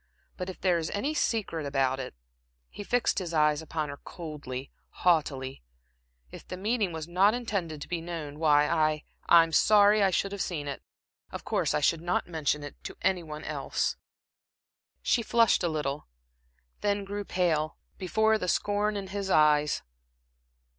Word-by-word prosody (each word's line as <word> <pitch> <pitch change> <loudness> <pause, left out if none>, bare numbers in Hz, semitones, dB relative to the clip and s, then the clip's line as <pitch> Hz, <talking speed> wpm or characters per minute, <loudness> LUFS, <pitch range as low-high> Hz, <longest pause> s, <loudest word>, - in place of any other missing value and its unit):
But 180 0 -5
if 185 - -8
there 180 -2 +2
is 160 - -3
any 250 +10 -1
secret 215 - -1
about 135 -2 0
it" 130 - -6 0.6
he 205 - -7
fixed 245 0 +1
his 170 -3 -4
eyes 150 0 +3
upon 155 -1 -3
her 140 - -7
coldly, 145 -7 -7 0.3
haughtily 140 - +1 0.7
"if - - -10
the 185 - -6
meeting 210 0 0
was 160 -1 -5
not 190 +5 +4
intended 185 -11 -3
to - - -11
be 175 -2 -3
known, 160 -4 -6
why 150 -2 +4
I 155 -2 +1 0.3
I'm 165 -1 +7
sorry 210 +3 +5
I 195 - +5
should 195 +2 0
have 200 -1 -4
seen 150 -5 -3
it. 140 - -5 0.5
Of - - -7
course - - 0
I - - +1
should 160 +2 +2
not 175 +1 -1
mention 150 -3 -1
it 145 - -10
to - - -7
any 185 -2 +2
one 155 -2 -8
else." - - -2 1.1
She 240 - +2
flushed 230 -1 +3
a - - +2
little, 150 -2 -3 0.7
then 205 -1 0
grew 205 +1 -4
pale, 160 -5 0 0.2
before 220 +4 +2
the 180 - -3
scorn 205 +3 +1
in 200 - -4
his 200 0 -3
eyes. 150 -3 +3
170 Hz, 165 wpm, -28 LUFS, 150-200 Hz, 1.1 s, I'm